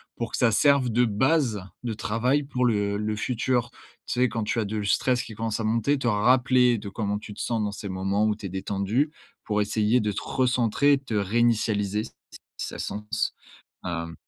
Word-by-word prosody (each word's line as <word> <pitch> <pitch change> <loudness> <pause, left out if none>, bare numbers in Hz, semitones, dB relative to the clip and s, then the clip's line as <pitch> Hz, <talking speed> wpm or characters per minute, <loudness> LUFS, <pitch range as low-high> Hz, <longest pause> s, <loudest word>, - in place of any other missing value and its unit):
pour 115 - -4
que - - -2
ça 120 -2 +3
serve 140 +1 +4
de 120 +2 +3
base 120 0 +1 0.2
de 120 -2 -2
travail 120 +7 0
pour 130 -2 -2
le 105 -3 +1
le 105 +1 -2
futur. 120 +1 0 0.4
Tu 125 - -1
sais, 125 - +4
quand 115 0 -2
tu 110 - -1
as - - -2
de 110 +2 -3
le 105 - -2
stress 125 +4 +2
qui 115 - -9
commence 110 0 -2
à 110 - -2
monter, 115 +6 +1
te 125 - -1
rappeler 125 +2 +4
de 105 -1 -7
comment 105 0 -2
tu 105 - -9
te - - -7
sens 115 -2 -1
dans 105 -1 -1
ces 100 0 -6
moments 95 +3 0
où 105 -1 +1
tu 105 - -9
es 95 - -3
détendu 100 - -1 0.3
pour 105 -1 0
essayer 105 +3 +2
de 105 -2 -1
te - - -4
recentrer, 130 +2 +2
et - - +4
de 135 - -14
te 125 - -6
réinitialiser 105 -1 +1
s - - -6
s - - -42 0.4
si - - -3
ça - - -7
sens, 105 +2 -2 0.5
hem 85 -2 -4
110 Hz, 225 wpm, -26 LUFS, 105-125 Hz, 0.5 s, serve